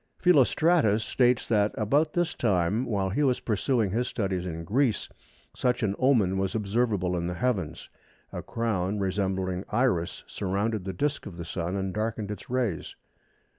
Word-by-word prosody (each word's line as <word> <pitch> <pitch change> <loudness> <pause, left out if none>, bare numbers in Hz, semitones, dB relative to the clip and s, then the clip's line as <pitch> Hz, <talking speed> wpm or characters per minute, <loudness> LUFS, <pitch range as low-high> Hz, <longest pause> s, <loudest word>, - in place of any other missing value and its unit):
Philostratus 155 - +4
states 125 0 +2
that 105 -2 +2
"about 145 +9 +2
this 175 -1 0
time 100 +2 +1
while 100 -5 -1
he 130 - 0
was 130 -4 +2
pursuing 110 -1 0
his 120 +4 0
studies 95 -4 -2
in 85 -1 -5
Greece 115 +4 +1 0.5
such 125 -1 0
an 100 -2 +1
omen 110 -8 +3
was 95 +2 -1
observable 105 -4 0
in 85 0 -2
the 90 - -3
heavens. 95 -10 -2 0.5
A - - -4
crown 105 -4 -1
resembling 95 -1 -1
Iris 105 -8 0
surrounded 100 +1 -2
the 95 - -2
disc 145 +7 -2
of 90 -4 -9
the 85 - -6
Sun 85 +2 -3
and 95 -1 -2
darkened 110 0 -2
its 105 - -8
rays." 120 -9 -2
105 Hz, 160 wpm, -27 LUFS, 95-125 Hz, 0.5 s, Philostratus